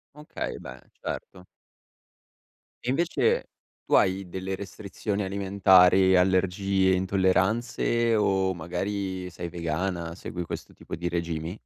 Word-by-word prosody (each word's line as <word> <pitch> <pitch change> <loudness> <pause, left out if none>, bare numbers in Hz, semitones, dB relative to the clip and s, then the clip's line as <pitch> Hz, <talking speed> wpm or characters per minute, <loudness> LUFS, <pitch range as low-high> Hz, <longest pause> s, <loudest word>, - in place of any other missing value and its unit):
Okay, 150 +1 -5
beh, - - -10 0.2
certo. 90 -1 -6 1.4
E - - -8
invece, 185 - +1 0.4
tu - - -3
hai 95 -1 +2
delle 95 +1 -4
restrizioni 100 +1 -4
alimentari, 95 -1 +5
allergie, 95 +1 +2
intolleranze 100 +5 +1
o 95 -2 +2
magari 95 +2 -3
sei 85 0 -6
vegana, 85 0 -3
segui 90 -2 -6
questo - - -7
tipo - - -8
di 85 +1 -3
regimi? 85 +1 -3
95 Hz, 110 wpm, -27 LUFS, 90-100 Hz, 1.4 s, alimentari